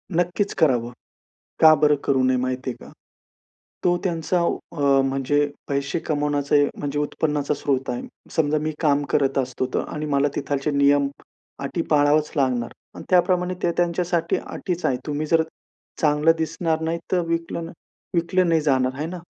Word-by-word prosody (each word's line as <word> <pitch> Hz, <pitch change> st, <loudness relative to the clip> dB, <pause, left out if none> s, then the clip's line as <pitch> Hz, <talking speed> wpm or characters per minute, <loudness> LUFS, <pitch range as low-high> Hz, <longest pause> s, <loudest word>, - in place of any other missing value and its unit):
नक्कीच 175 Hz, +4 st, 0 dB
करावं. 120 Hz, -6 st, +2 dB, 0.7 s
का 155 Hz, -1 st, +9 dB
बरं 150 Hz, 0 st, +3 dB
करू 135 Hz, -2 st, +2 dB
नये 130 Hz, 0 st, +3 dB
माहिती 130 Hz, +1 st, -2 dB
आहे 120 Hz, -, -7 dB
का? -, -, -14 dB, 0.9 s
तो 175 Hz, 0 st, +3 dB
त्यांचा 175 Hz, -1 st, 0 dB, 0.3 s
अ, 140 Hz, -4 st, +3 dB
म्हणजे 135 Hz, +2 st, +1 dB, 0.2 s
पैसे 140 Hz, +3 st, -1 dB
कमवण्याचे 145 Hz, -1 st, +2 dB
म्हणजे 145 Hz, 0 st, -2 dB
उत्पन्नाचा 150 Hz, -1 st, -1 dB
स्रोत 135 Hz, -2 st, -1 dB
आहे. 120 Hz, 0 st, -2 dB, 0.3 s
समजा 155 Hz, -2 st, +2 dB
मी 155 Hz, +1 st, -2 dB
काम 145 Hz, -2 st, +3 dB
करत 135 Hz, -1 st, +1 dB
असतो 130 Hz, -1 st, -1 dB
तर -, -, +1 dB
आणि 150 Hz, 0 st, -3 dB
मला 140 Hz, +1 st, +3 dB
तिथले 140 Hz, +1 st, -1 dB
नियम, 140 Hz, 0 st, +3 dB, 0.5 s
अटी 155 Hz, +5 st, -2 dB
पाळावेच 150 Hz, 0 st, +3 dB
लागणार 125 Hz, -4 st, +1 dB, 0.3 s
आणि -, -, -8 dB
त्याप्रमाणे 180 Hz, 0 st, +3 dB
ते 175 Hz, -, +2 dB
त्यांच्यासाठी 170 Hz, -1 st, 0 dB
अटीच 180 Hz, -2 st, -4 dB
आहे. 130 Hz, -, +1 dB
तुम्ही 150 Hz, +1 st, -2 dB
जर 165 Hz, +1 st, +3 dB, 0.6 s
चांगलं 150 Hz, +1 st, +4 dB
दिसणार 160 Hz, 0 st, -1 dB
नाही 165 Hz, +1 st, -1 dB
तर 185 Hz, -, +3 dB
विकलं 165 Hz, 0 st, -2 dB
न 165 Hz, -, -8 dB, 0.4 s
विकलं 175 Hz, +1 st, +2 dB
नाही 160 Hz, -1 st, +3 dB
जाणार, 130 Hz, -3 st, +2 dB
आहे 150 Hz, +3 st, -3 dB
ना? 180 Hz, +1 st, -6 dB
150 Hz, 160 wpm, -23 LUFS, 140-165 Hz, 0.9 s, का